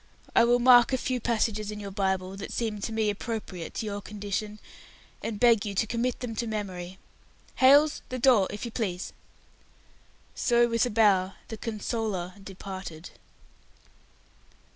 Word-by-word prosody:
I 235 - +6
will 240 +1 +4
mark 245 0 +6
a 260 - +2
few 255 0 -2
passages 220 -2 0
in 210 0 -5
your 200 -1 -6
Bible, 190 -1 -1
that 195 - -7
seem 215 -3 -2
to 225 - -3
me 220 -1 +1
appropriate 205 -5 -6
to - - -3
your 205 -1 -4
condition, 210 +1 -4 0.6
and 215 -3 -4
beg 230 -3 +5
you 205 -2 -4
to 195 - +2
commit 235 +3 -2
them 245 -3 -4
to 235 - -1
memory. 190 -4 -5 0.6
Hailes, 285 +3 +5
the 255 - -3
door, 240 -6 +4
if 205 +3 -6
you 235 - -5
please." 195 -6 -3 1.2
So, 240 -2 +3
with 230 +1 +1
a - - -3
bow, 200 -4 +3 0.2
the 220 - -6
"consoler" 215 -4 -3
departed. 190 -4 -8
215 Hz, 155 wpm, -27 LUFS, 195-235 Hz, 1.2 s, I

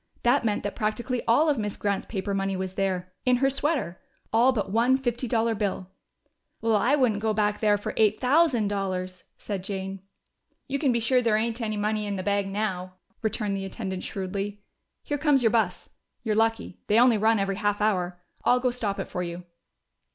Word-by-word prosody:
That 240 +1 +3
meant 210 -2 0
that 205 - -3
practically 240 +3 -1
all 265 +8 +4
of 290 -5 +2
Miss 210 -1 -3
Grant's 200 -1 -1
paper 200 -1 -3
money 195 -1 -1
was 190 0 -4
there 185 -2 -2
in 250 -1 +4
her 270 +2 +2
sweater! 275 - -1 0.3
All 240 +4 +5
but 210 -6 -2
one 240 +4 +3
fifty 245 -1 -2
dollar 230 0 +1
bill! 195 -3 -3 0.7
"Well, 225 -1 +2
I 245 +7 +3
wouldn't 235 -7 +1
go 220 -1 0
back 210 -1 +1
there 210 -1 +3
for 205 - -5
eight 215 -1 +3
thousand 260 -4 +3
dollars!" 185 -2 -3
said 195 -3 -5
Jane. 195 -1 -5 0.7
"You 275 +1 -2
can 275 -3 +2
be 235 - +1
sure 250 +2 +3
there 225 -3 +2
ain't 230 +2 -1
any 215 -2 -2
money 210 0 -1
in 200 - -2
the 185 - -4
bag 200 0 0
now," 190 -3 -3 0.3
returned 210 -2 -1
the 195 0 -3
attendant 190 -2 -5
shrewdly. 200 +1 -4 0.4
"Here 290 -1 -2
comes 290 -4 +3
your 225 - +4
bus. 230 -2 0 0.3
You're 220 -3 0
lucky: 225 -3 0
they 210 - +3
only 240 -3 +5
run 220 +2 +3
every 195 -1 -1
half 205 -1 0
hour.... 180 -4 0 0.2
I'll 250 - +4
go 250 0 +1
stop 215 -5 -2
it 195 - -4
for 180 - -4
you." 175 0 -5
215 Hz, 200 wpm, -26 LUFS, 195-235 Hz, 0.7 s, All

